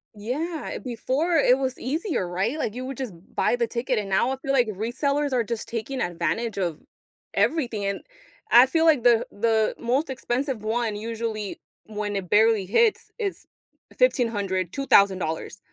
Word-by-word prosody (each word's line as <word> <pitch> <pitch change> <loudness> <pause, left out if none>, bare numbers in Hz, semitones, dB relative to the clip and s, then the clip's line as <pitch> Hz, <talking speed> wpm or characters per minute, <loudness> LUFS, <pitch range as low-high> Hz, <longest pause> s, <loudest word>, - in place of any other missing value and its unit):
Yeah, 295 +10 -4
eh, - - -4
before 270 +7 -1
it 260 -3 +5
was 260 -1 -2
easier, 305 - -2
right? 195 - -1
Like, 220 -7 -2
you 255 +1 -5
would 265 -1 -6
just 255 -7 -4 0.2
buy - - +2
the 240 - +1
ticket, 245 +2 -1
and 205 -2 -2
now 195 +6 +2
I 265 - -2
feel 275 0 -3
like 245 -3 +4
resellers 260 +7 -1
are 245 -2 +2
just 230 0 -4
taking 235 +3 -4
advantage 205 +6 -2
of 170 -5 -2 0.5
everything, 240 -10 0
and 200 0 -2 0.5
I 245 +2 +8
feel 325 +4 +2
like 300 -7 +4
the 235 -2 +5
the 220 0 +1
most 260 +6 0
expensive 260 -2 -2
one, 225 0 -1
usually, 220 -1 -4 0.3
when 210 -1 -4
it 190 -3 -4
barely 220 -1 +4
hits 435 - +2
is 405 -5 -3 0.5
$1,500, 205 - +1
$2,000, 195 - +2
235 Hz, 165 wpm, -25 LUFS, 210-270 Hz, 0.5 s, I